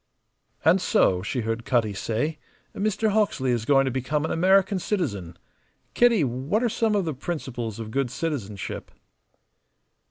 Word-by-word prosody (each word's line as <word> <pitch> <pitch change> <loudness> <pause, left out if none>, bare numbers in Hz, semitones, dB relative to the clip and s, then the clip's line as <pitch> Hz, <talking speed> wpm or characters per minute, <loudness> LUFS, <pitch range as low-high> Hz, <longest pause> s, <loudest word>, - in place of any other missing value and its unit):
"And 175 +4 +5
so," 90 - +3
she 120 +6 -2
heard 115 +1 -2
Cutty 115 -4 +1
say. 120 +10 -2 0.4
"Mr. 215 +1 0
Hawksley 200 -11 +1
is 115 -2 -1
going 135 +1 +4
to 130 - 0
become 135 +4 -1
an - - -2
American 190 +3 +3
citizen. 100 - -3 0.6
Kitty, 235 -7 +4
what 135 - -1
are 240 - +2
some 220 -1 +1
of 200 -3 +1
the 160 - -2
principles 130 - -5
of 110 -1 -6
good 135 0 0
citizenship?" 120 - -4
140 Hz, 150 wpm, -25 LUFS, 115-190 Hz, 0.6 s, And